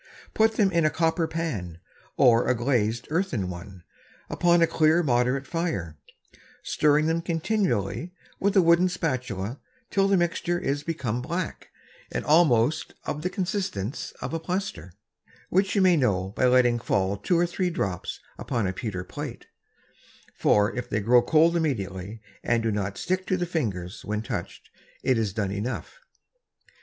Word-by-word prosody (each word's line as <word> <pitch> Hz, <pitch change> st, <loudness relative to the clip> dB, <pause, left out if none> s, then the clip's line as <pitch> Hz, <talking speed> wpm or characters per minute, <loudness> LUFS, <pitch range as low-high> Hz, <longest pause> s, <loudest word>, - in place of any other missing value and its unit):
Put 220 Hz, 0 st, +3 dB
them 200 Hz, -3 st, +2 dB
in 170 Hz, -2 st, +2 dB
a 155 Hz, -, +4 dB
Copper 165 Hz, +1 st, +1 dB
Pan, 115 Hz, -, -4 dB, 0.4 s
or 120 Hz, -1 st, +5 dB
a 125 Hz, -, +3 dB
glazed 120 Hz, -3 st, 0 dB
Earthen 150 Hz, -, -1 dB
one, 90 Hz, 0 st, -10 dB, 0.5 s
upon 175 Hz, -1 st, +4 dB
a -, -, +7 dB
clear 160 Hz, +1 st, +3 dB
moderate 125 Hz, 0 st, +1 dB
Fire, 160 Hz, -, -3 dB, 0.7 s
stirring 150 Hz, 0 st, +2 dB
them 165 Hz, +1 st, +1 dB
continually 165 Hz, -, -1 dB, 0.3 s
with 200 Hz, +1 st, +1 dB
a 190 Hz, -, +6 dB
wooden 170 Hz, +2 st, +5 dB
Spatula 130 Hz, -, -3 dB, 0.3 s
till 195 Hz, 0 st, +3 dB
the 195 Hz, -1 st, +3 dB
Mixture 175 Hz, 0 st, 0 dB
is 145 Hz, -4 st, -1 dB
become 140 Hz, -8 st, -3 dB
black, 170 Hz, +6 st, -4 dB, 0.4 s
and -, -, -3 dB
almost 150 Hz, -3 st, +3 dB
of 150 Hz, -, -4 dB
the 180 Hz, -, -1 dB
Consistence 180 Hz, -, -3 dB
of -, -, -4 dB
a 165 Hz, -, -1 dB
Plaister, 170 Hz, -, -4 dB, 0.6 s
(which 190 Hz, 0 st, +1 dB
you 200 Hz, -, +4 dB
may 185 Hz, -2 st, +5 dB
know 95 Hz, -9 st, +1 dB
by 105 Hz, -, 0 dB
letting 125 Hz, -1 st, +4 dB
fall 100 Hz, -3 st, 0 dB
two 170 Hz, -, 0 dB
or 175 Hz, -, +3 dB
three 180 Hz, +1 st, -1 dB
Drops 100 Hz, -, -3 dB, 0.2 s
upon 120 Hz, -6 st, -1 dB
a 95 Hz, -, -1 dB
Pewter 95 Hz, -3 st, -4 dB
Plate; -, -, -7 dB, 0.9 s
for 105 Hz, 0 st, +2 dB
if 125 Hz, 0 st, -4 dB
they 105 Hz, -, 0 dB
grow 120 Hz, +4 st, +5 dB
cold 160 Hz, +5 st, +4 dB
immediately, 105 Hz, -, -2 dB, 0.2 s
and 115 Hz, -1 st, +1 dB
do 115 Hz, -, +1 dB
not 100 Hz, -1 st, -2 dB
stick 185 Hz, +1 st, -2 dB
to 185 Hz, -, +1 dB
the 175 Hz, -, -1 dB
Fingers, 100 Hz, -, -3 dB
when 105 Hz, +1 st, -3 dB
touch'd, -, -, -6 dB, 0.4 s
it 130 Hz, -3 st, +2 dB
is 110 Hz, -3 st, 0 dB
done 100 Hz, -1 st, -2 dB
enough.) 115 Hz, -, -4 dB
135 Hz, 160 wpm, -26 LUFS, 105-170 Hz, 0.9 s, a